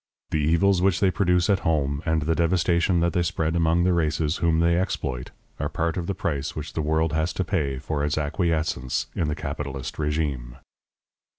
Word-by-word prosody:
The 80 Hz, -, +1 dB
evils 85 Hz, +5 st, +3 dB
which 95 Hz, -1 st, +2 dB
they 95 Hz, -2 st, +3 dB
produce 90 Hz, -2 st, +2 dB
at 100 Hz, -3 st, +3 dB
home, 70 Hz, -3 st, 0 dB
and 80 Hz, -1 st, +1 dB
the 80 Hz, +2 st, +1 dB
devastation 85 Hz, +1 st, +2 dB
that 85 Hz, 0 st, +1 dB
they 90 Hz, -, +2 dB
spread 80 Hz, -1 st, -1 dB
among 85 Hz, +1 st, +2 dB
the 90 Hz, 0 st, +3 dB
races 80 Hz, -1 st, 0 dB
whom 80 Hz, -1 st, +2 dB
they 85 Hz, 0 st, +3 dB
exploit, 65 Hz, -8 st, -2 dB, 0.3 s
are -, -, -1 dB
part 80 Hz, 0 st, -1 dB
of 85 Hz, -2 st, -3 dB
the 100 Hz, -, -2 dB
price 75 Hz, -6 st, -2 dB
which 75 Hz, 0 st, -6 dB
the 80 Hz, -, -1 dB
world 80 Hz, +1 st, +1 dB
has 80 Hz, +2 st, 0 dB
to 95 Hz, -, -1 dB
pay 70 Hz, -5 st, -1 dB
for 70 Hz, +2 st, -3 dB
its 75 Hz, +1 st, 0 dB
acquiescence 75 Hz, -4 st, -1 dB
in 80 Hz, -, 0 dB
the 75 Hz, -, -1 dB
capitalist 70 Hz, -3 st, -5 dB
régime. 75 Hz, -6 st, -2 dB
80 Hz, 195 wpm, -25 LUFS, 75-85 Hz, 0.3 s, evils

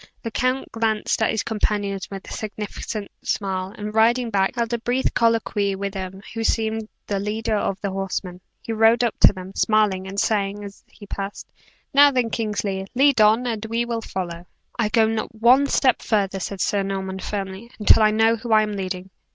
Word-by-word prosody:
The 230 Hz, -, -4 dB
count 255 Hz, +3 st, -1 dB
glanced 225 Hz, -1 st, 0 dB
at 220 Hz, -, +3 dB
his 220 Hz, -, 0 dB
companions 205 Hz, -3 st, -2 dB
with 195 Hz, -1 st, -8 dB
a -, -, -7 dB
significant 210 Hz, 0 st, -5 dB
smile, 190 Hz, -2 st, -2 dB
and 210 Hz, 0 st, -5 dB
riding 230 Hz, +2 st, +3 dB
back, 195 Hz, +3 st, +1 dB
held 235 Hz, -1 st, -1 dB
a 235 Hz, -, 0 dB
brief 245 Hz, +3 st, 0 dB
colloquy 220 Hz, -4 st, +1 dB
with 200 Hz, 0 st, -4 dB
him 190 Hz, 0 st, -6 dB
who 225 Hz, 0 st, -3 dB
seemed 220 Hz, -1 st, 0 dB, 0.2 s
the 200 Hz, -1 st, -2 dB
leader 215 Hz, +2 st, -1 dB
of 195 Hz, -1 st, -1 dB
the 200 Hz, -, -2 dB
horsemen. 190 Hz, -1 st, -4 dB, 0.2 s
He 225 Hz, -, -3 dB
rode 225 Hz, +2 st, +4 dB
up 235 Hz, -, -1 dB
to -, -, +8 dB
them, 190 Hz, -1 st, -9 dB
smiling 210 Hz, -4 st, +2 dB
still, -, -, -7 dB
and 200 Hz, +1 st, -3 dB
saying, 205 Hz, -1 st, 0 dB
as 200 Hz, 0 st, -10 dB
he 205 Hz, -, -14 dB
passed, 200 Hz, 0 st, -6 dB, 0.4 s
"Now 285 Hz, +1 st, +8 dB
then, 250 Hz, -4 st, 0 dB
Kingsley; 200 Hz, -3 st, -2 dB
lead 275 Hz, -2 st, +4 dB
on, 220 Hz, +4 st, +5 dB
and 225 Hz, -3 st, -2 dB
we 230 Hz, +2 st, -1 dB
will 235 Hz, -1 st, -3 dB
follow!" 175 Hz, -4 st, -5 dB, 0.3 s
"I 220 Hz, -3 st, +2 dB
go 220 Hz, +1 st, +4 dB
not 220 Hz, 0 st, -2 dB
one 250 Hz, +5 st, +5 dB
step 260 Hz, -2 st, +2 dB
further," 195 Hz, -3 st, 0 dB
said 190 Hz, 0 st, -4 dB
Sir 205 Hz, -, +1 dB
Norman, 190 Hz, -1 st, -3 dB
firmly, 195 Hz, +3 st, -5 dB
"until 215 Hz, +1 st, +5 dB
I 215 Hz, -, +6 dB
know 225 Hz, +1 st, +3 dB
who 230 Hz, +1 st, -6 dB
I 215 Hz, 0 st, +6 dB
am 210 Hz, -, -3 dB
leading. 190 Hz, -1 st, -5 dB
215 Hz, 200 wpm, -23 LUFS, 195-225 Hz, 0.4 s, to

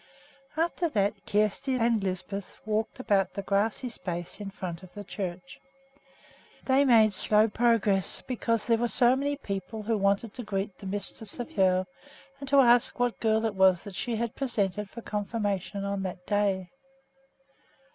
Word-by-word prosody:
After 340 Hz, +1 st, 0 dB
that 205 Hz, -6 st, +1 dB
Kjersti 215 Hz, +6 st, +1 dB
and 230 Hz, -3 st, +2 dB
Lisbeth 195 Hz, +1 st, -4 dB
walked 220 Hz, +3 st, -1 dB
about 200 Hz, -6 st, +1 dB
the 200 Hz, -, -3 dB
grassy 205 Hz, +6 st, 0 dB
space 175 Hz, -7 st, -6 dB
in 205 Hz, -1 st, -5 dB
front 180 Hz, -3 st, -6 dB
of 185 Hz, -1 st, -13 dB
the 205 Hz, -, -6 dB
church. 180 Hz, -2 st, -6 dB, 1.1 s
They 265 Hz, +1 st, +4 dB
made 220 Hz, -5 st, +5 dB
slow 215 Hz, +3 st, +4 dB
progress, 215 Hz, -4 st, +1 dB
because 230 Hz, -3 st, -1 dB
there 230 Hz, -1 st, +2 dB
were 240 Hz, -, +1 dB
so 245 Hz, +1 st, +4 dB
many 285 Hz, +2 st, -1 dB
people 210 Hz, -4 st, -5 dB
who 225 Hz, +2 st, 0 dB
wanted 200 Hz, +2 st, +1 dB
to 245 Hz, -, -6 dB
greet 195 Hz, -2 st, -3 dB
the 195 Hz, -, -8 dB
mistress 205 Hz, +3 st, -4 dB
of 245 Hz, -, -5 dB
Hoel 185 Hz, -1 st, +3 dB, 0.5 s
and 275 Hz, -1 st, -7 dB
to 280 Hz, 0 st, +6 dB
ask 240 Hz, -1 st, +4 dB
what 245 Hz, -1 st, 0 dB
girl 220 Hz, 0 st, +2 dB
it 220 Hz, -, 0 dB
was 190 Hz, -2 st, +4 dB
that 200 Hz, -, -9 dB
she 230 Hz, +5 st, -2 dB
had 230 Hz, 0 st, -2 dB
presented 210 Hz, -6 st, -1 dB
for 235 Hz, +2 st, -9 dB
confirmation 205 Hz, -2 st, -2 dB
on 200 Hz, 0 st, -2 dB
that 180 Hz, -1 st, -5 dB
day. 195 Hz, -3 st, 0 dB
210 Hz, 165 wpm, -28 LUFS, 195-235 Hz, 1.1 s, to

